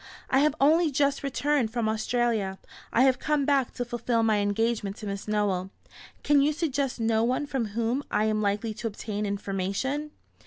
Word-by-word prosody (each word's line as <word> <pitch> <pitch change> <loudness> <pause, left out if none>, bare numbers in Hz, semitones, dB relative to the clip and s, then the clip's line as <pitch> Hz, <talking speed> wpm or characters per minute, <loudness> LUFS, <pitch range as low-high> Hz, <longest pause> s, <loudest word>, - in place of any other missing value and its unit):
"I 265 - +5
have 300 +1 +3
only 315 +4 +4
just 280 0 +1
returned 280 -3 0
from 235 -2 -1
Australia. 220 -3 0 0.3
I 240 - +4
have 260 -1 +3
come 300 -2 0
back 275 -3 +2
to 245 - -2
fulfil 240 -1 0
my 220 -1 +3
engagement 205 0 0
to 215 - -9
Miss 200 0 -5
Nowell. 200 -3 0 0.5
Can 290 -1 +4
you 295 +2 +2
suggest 285 -5 -1
no 225 0 +2
one 255 +5 0
from 265 -4 -2
whom 235 +4 0
I 215 - +1
am 215 0 +1
likely 210 +2 -1
to 225 +2 -4
obtain 210 -1 -4
information?" 200 +9 -2
235 Hz, 180 wpm, -27 LUFS, 210-275 Hz, 0.5 s, I